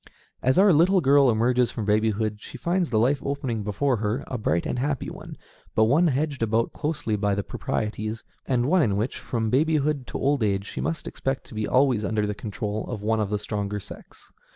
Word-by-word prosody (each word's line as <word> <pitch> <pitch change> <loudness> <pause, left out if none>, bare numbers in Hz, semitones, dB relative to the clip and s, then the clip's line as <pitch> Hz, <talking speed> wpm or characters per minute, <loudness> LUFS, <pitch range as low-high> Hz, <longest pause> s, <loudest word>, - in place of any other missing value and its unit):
As 130 +5 +2
our 195 -1 +6
little 180 +5 +5
girl 140 -3 +5
emerges 120 +2 +2
from 110 - -4
babyhood 110 0 +1
she - - -9
finds 175 0 0
the 110 - +1
life 130 +6 +3
opening 130 -5 -2
before 105 +6 0
her 110 +5 -2
a - - -5
bright 85 -8 0
and 125 - -2
happy 140 0 -2
one, - - -10 0.4
but 110 - +5
one 145 +10 +4
hedged 145 -1 -1
about 115 +1 +1
closely 145 -7 -2
by 105 -1 0
the 100 - -2
proprieties, 110 +4 -3 0.2
and 125 -2 +1
one 180 +6 +3
in 100 -8 +1
which, 110 +5 -2
from 110 -3 -2
babyhood 150 -1 +1
to - - -4
old 140 -1 +1
age, 100 -2 0
she - - -5
must 165 +1 -3
expect 135 0 -3
to - - -14
be 110 -1 -2
always 130 -4 +3
under 105 0 0
the 105 - -2
control 105 0 -4
of 110 -4 -5
one 110 +1 +1
of 105 -2 -1
the 105 - 0
stronger 105 -1 -3
sex. - - -13
115 Hz, 210 wpm, -25 LUFS, 105-140 Hz, 0.4 s, our